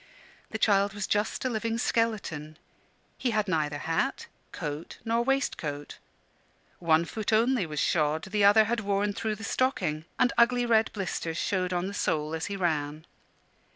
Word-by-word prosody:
The 220 Hz, -, -3 dB
child 200 Hz, -1 st, +3 dB
was 205 Hz, -2 st, -2 dB
just 210 Hz, +4 st, -1 dB
a -, -, +2 dB
living 225 Hz, 0 st, -1 dB
skeleton; 205 Hz, -11 st, -1 dB, 0.6 s
he 255 Hz, -, 0 dB
had 215 Hz, -2 st, 0 dB
neither 150 Hz, -4 st, 0 dB
hat, 165 Hz, +2 st, -1 dB, 0.3 s
coat, 150 Hz, +2 st, -5 dB
nor 230 Hz, +1 st, +1 dB
waistcoat; 165 Hz, -, -2 dB, 0.8 s
one 165 Hz, -1 st, +3 dB
foot 215 Hz, +5 st, -3 dB
only 225 Hz, -3 st, +3 dB
was 150 Hz, -2 st, -4 dB
shod, 155 Hz, -1 st, +1 dB
the 205 Hz, +2 st, 0 dB
other 205 Hz, +2 st, +7 dB
had 230 Hz, +2 st, -1 dB
worn 205 Hz, 0 st, 0 dB
through 215 Hz, +1 st, -2 dB
the 220 Hz, -, -10 dB
stocking, 195 Hz, -, 0 dB
and 245 Hz, -, +3 dB
ugly 245 Hz, +1 st, +4 dB
red 225 Hz, -2 st, +3 dB
blisters 170 Hz, -5 st, -3 dB
showed 185 Hz, -1 st, 0 dB
on 175 Hz, 0 st, 0 dB
the 200 Hz, -, -4 dB
sole 155 Hz, -5 st, -1 dB
as 160 Hz, 0 st, -2 dB
he 200 Hz, -, -4 dB
ran. 155 Hz, -4 st, -1 dB
200 Hz, 160 wpm, -28 LUFS, 160-225 Hz, 0.8 s, other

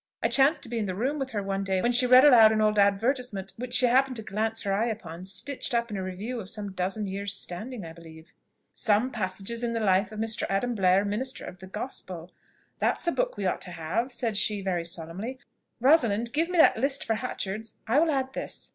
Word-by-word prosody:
I -, -, +3 dB
chanced 280 Hz, +4 st, +3 dB
to -, -, -6 dB
be 235 Hz, -1 st, -2 dB
in 210 Hz, -, -2 dB
the 185 Hz, -, -3 dB
room 265 Hz, +9 st, -1 dB
with 270 Hz, -1 st, -3 dB
her 210 Hz, -5 st, -3 dB
one 195 Hz, 0 st, -2 dB
day 190 Hz, -1 st, 0 dB
when 240 Hz, +6 st, +1 dB
she 250 Hz, +1 st, +3 dB
read 255 Hz, +2 st, +8 dB
aloud 230 Hz, -6 st, +8 dB
an 220 Hz, -, +1 dB
old 215 Hz, -1 st, +2 dB
advertisement 200 Hz, 0 st, +1 dB
which 250 Hz, +1 st, -3 dB
she 255 Hz, -, +5 dB
happened 260 Hz, +2 st, +3 dB
to 220 Hz, -, -5 dB
glance 220 Hz, +2 st, -2 dB
her 200 Hz, -2 st, 0 dB
eye 215 Hz, +4 st, +1 dB
upon, 185 Hz, -6 st, -6 dB
stitched 240 Hz, +7 st, -2 dB
up 235 Hz, -1 st, 0 dB
in -, -, -3 dB
a -, -, -3 dB
Review 195 Hz, +7 st, -5 dB
of 195 Hz, -3 st, -8 dB
some 210 Hz, -3 st, -4 dB
dozen 190 Hz, +3 st, -2 dB
years 200 Hz, +1 st, -2 dB
standing 210 Hz, +4 st, -4 dB
I 160 Hz, -, -9 dB
believe, 160 Hz, -1 st, -14 dB, 0.4 s
'Some 220 Hz, +4 st, +1 dB
passages 205 Hz, +2 st, -4 dB
in 235 Hz, -1 st, -1 dB
the 230 Hz, -, -1 dB
life 195 Hz, -1 st, +2 dB
of 215 Hz, -, -8 dB
Mr. 225 Hz, 0 st, -2 dB
Adam 220 Hz, +6 st, 0 dB
Blair, 195 Hz, -1 st, +3 dB
Minister 240 Hz, +6 st, -3 dB
of 180 Hz, -, -10 dB
the 190 Hz, -, -10 dB
Gospel.' 185 Hz, -5 st, -7 dB, 0.5 s
'That's -, -, +1 dB
a 340 Hz, -, +2 dB
book -, -, -1 dB
we 200 Hz, -, -3 dB
ought 185 Hz, -, -1 dB
to 180 Hz, -, -4 dB
have,' 170 Hz, +10 st, -2 dB
said 230 Hz, -3 st, -1 dB
she 210 Hz, 0 st, 0 dB
very 180 Hz, -3 st, -1 dB
solemnly; 170 Hz, +9 st, -4 dB, 0.4 s
'Rosalind, 235 Hz, -5 st, +3 dB
give 325 Hz, +3 st, +1 dB
me 360 Hz, -, -2 dB
that 320 Hz, -, +6 dB
list 275 Hz, +1 st, -1 dB
for 225 Hz, -, +1 dB
Hatchard's, 220 Hz, -2 st, -4 dB
I 235 Hz, +6 st, +3 dB
will 325 Hz, +1 st, +3 dB
add 265 Hz, -3 st, -1 dB
this.' -, -, -6 dB
220 Hz, 235 wpm, -27 LUFS, 195-250 Hz, 0.5 s, read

